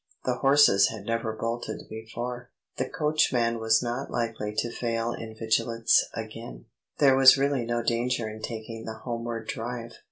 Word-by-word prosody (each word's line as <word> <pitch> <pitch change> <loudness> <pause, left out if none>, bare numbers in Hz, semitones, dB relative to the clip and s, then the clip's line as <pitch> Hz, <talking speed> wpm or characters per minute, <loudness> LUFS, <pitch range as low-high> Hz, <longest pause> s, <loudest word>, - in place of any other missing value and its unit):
The 125 -1 0
horses 135 -8 +5
had 110 -3 -7
never 115 0 -1
bolted 115 +2 -4
before; 120 +3 -6 0.3
the - - -2
coachman 125 -7 +1
was 110 +1 +3
not 120 +3 -3
likely 115 -3 -2
to 120 - -1
fail 115 -1 -2
in 110 -1 -8
vigilance 115 +1 +2
again; 115 +1 -8 0.3
there 135 -2 +5
was 135 +1 +8
really 140 -3 +1
no 120 0 -1
danger 120 0 0
in 110 0 -8
taking 115 0 -6
the 110 - -5
homeward 115 -2 -4
drive. 120 0 -5
115 Hz, 155 wpm, -27 LUFS, 110-125 Hz, 0.3 s, was